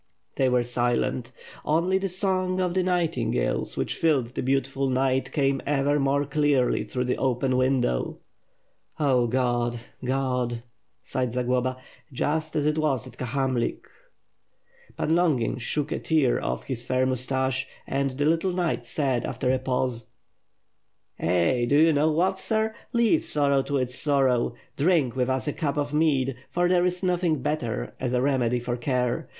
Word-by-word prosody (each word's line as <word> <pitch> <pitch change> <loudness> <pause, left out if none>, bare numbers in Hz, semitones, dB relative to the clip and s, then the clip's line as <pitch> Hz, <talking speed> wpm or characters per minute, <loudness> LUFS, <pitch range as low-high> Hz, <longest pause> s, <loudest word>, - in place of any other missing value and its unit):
They 130 -1 +2
were 125 -1 +2
silent. 120 0 -1 0.3
Only 170 +5 +2
the 195 0 -2
song 185 0 0
of 180 -1 0
the 185 - +2
nightingales 175 - 0
which - - -1
filled 135 -7 +1
the - - -2
beautiful 135 +1 0
night 130 0 +1
came 135 -2 +1
ever 145 0 +1
more 140 +1 +1
clearly 145 -3 +1
through 125 - -3
the 125 0 -1
open 130 0 +1
window. 130 - +1 0.8
"Oh 130 -5 +3
God, 120 -1 0 0.2
God!" 125 -2 -1 0.4
sighed 125 -2 -2
Zagloba. 125 +1 0 0.3
"Just 155 +4 -2
as 150 -2 +1
it 150 +1 +1
was 140 -6 0
at 125 -2 -13
Ka - - -2
hamlik." 130 -1 -1 1.1
Pan 160 - +1
Longin 140 -9 +1
shook 145 +4 -2
a - - -1
tear 155 -6 +2
ofiE - - -3
his 125 -3 -4
fair 130 +1 +1
moustache, 130 +1 -1 0.2
and 135 0 0
the 140 +2 -2
little 165 +4 +2
knight 175 -9 -1
said, 130 -2 0
after 125 +1 -1
a 130 - +1
pause: 125 -3 -2 1.1
"Eh! 90 +8 +2
Do 140 +4 +3
you 160 +1 +5
know 150 +2 +3
what, 185 +4 +1
sir? 220 +1 0 0.2
Leave 235 -2 +3
sorrow 140 -2 +2
to 140 +1 -2
its 125 -1 -1
sorrow. 130 -4 +2 0.2
Drink 145 -6 +2
with 125 0 0
us 130 +2 -1
a 145 - 0
cup 150 -4 -2
of 145 0 -1
mead, 135 -5 +1
for 175 0 +1
there 180 0 +3
is 180 +1 -3
nothing 175 -6 +1
better 120 -8 -2
as 125 -1 -2
a 125 - +2
remedy 125 -3 +1
for 120 0 -3
care. 125 -1 -1
135 Hz, 160 wpm, -26 LUFS, 125-155 Hz, 1.1 s, you